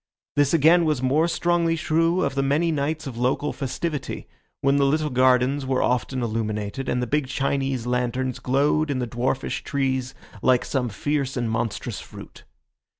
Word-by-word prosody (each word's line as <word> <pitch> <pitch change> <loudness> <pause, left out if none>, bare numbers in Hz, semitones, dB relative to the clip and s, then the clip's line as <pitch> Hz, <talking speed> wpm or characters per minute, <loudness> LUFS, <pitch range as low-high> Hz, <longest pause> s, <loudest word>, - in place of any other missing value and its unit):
This 145 -1 +3
again 165 +2 +5
was 150 -5 0
more 150 +6 +3
strongly 170 -1 +1
true 165 +2 +1
of 140 - 0
the 135 - 0
many 150 +5 +1
nights 155 +1 -2
of 125 -4 -6
local 130 +4 0
festivity, 150 +2 -4 0.3
when 140 +1 +3
the 140 - +3
little 150 +1 +1
gardens 130 +2 +3
were 130 -1 0
often 125 0 0
illuminated, 110 +2 -3
and 125 0 0
the - - 0
big 145 +2 0
Chinese 135 -2 -1
lanterns 125 +1 -1
glowed 145 +4 +1
in 140 - 0
the 125 - -1
dwarfish 125 +3 -2
trees 130 -2 -1 0.3
like 130 -1 +3
some 125 -3 -1
fierce 135 +4 -2
and 120 -2 -1
monstrous 115 0 -3
fruit. - - -12
135 Hz, 165 wpm, -24 LUFS, 125-150 Hz, 0.3 s, again